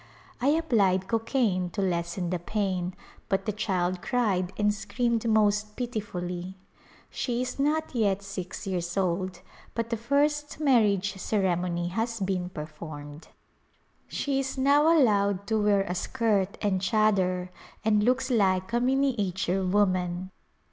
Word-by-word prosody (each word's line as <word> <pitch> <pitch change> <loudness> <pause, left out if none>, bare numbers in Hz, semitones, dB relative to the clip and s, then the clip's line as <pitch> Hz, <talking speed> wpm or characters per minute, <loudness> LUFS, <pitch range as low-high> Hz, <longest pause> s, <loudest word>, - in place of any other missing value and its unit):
I 255 - +2
applied 215 - +2
co 230 - +1
caine 215 -7 0
to - - -1
lessen 170 0 -1
the 180 - -1
pain 185 -1 -2 0.3
but 195 0 0
the 215 - 0
child 185 -3 -1
cried 200 -8 0
and 210 0 +2
screamed 225 +2 -1
most 210 -1 +2
pitifully. 190 -6 -4 0.6
She 240 -2 -2
is 255 +2 -5
not 305 +2 0
yet 200 -4 +1
six 190 -2 -6
years 180 -2 -3
old 185 -1 -1 0.3
but 230 0 -2
the 230 - 0
first 290 +5 0
marriage 210 -9 +3
ceremony 180 -3 0
has 225 +4 -2
been 185 -2 -1
performed. 150 -2 -8 0.8
She 275 -1 -1
is 270 0 -3
now 285 +4 +4
allowed 200 -7 +3
to 220 +1 +1
wear 205 -1 +4
a 180 - -3
skirt 205 -1 0
and 190 -3 +1
chadar 190 -3 +2 0.4
and 210 -1 +3
looks 255 +2 +1
like 190 -2 +2
a 240 - +3
miniature 215 -8 +1
woman. 185 -2 +1
200 Hz, 135 wpm, -27 LUFS, 185-230 Hz, 0.8 s, now